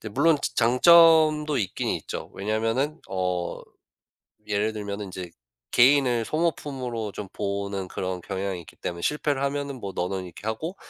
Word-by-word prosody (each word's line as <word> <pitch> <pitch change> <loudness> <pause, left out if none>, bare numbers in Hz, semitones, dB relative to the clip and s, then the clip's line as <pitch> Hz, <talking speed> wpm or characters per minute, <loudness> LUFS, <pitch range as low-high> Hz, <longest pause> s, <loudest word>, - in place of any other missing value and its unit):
이제 110 - -6
물론 160 +10 +3
자 - - -2
장점도 155 +3 +6
있긴 95 - -2
있죠. - - -4
왜냐면은 115 +9 -1
어 90 -2 -2 0.9
예를 105 +1 0
들면은 105 -1 -5
인제 90 -2 -7 0.4
개인을 125 -2 +4
소모품으로 130 - -2
좀 100 0 -7
보는 100 -1 -3
그런 90 0 -4
경향이 95 0 -3
있기 80 - -16
때문에 85 0 -5
실패를 150 -2 0
하면은 140 -1 -2
뭐 100 -4 -6
너는 90 +1 -2
이렇게 90 +3 -11
하고 155 - -3
110 Hz, 325 characters per minute, -25 LUFS, 95-145 Hz, 0.9 s, 장점도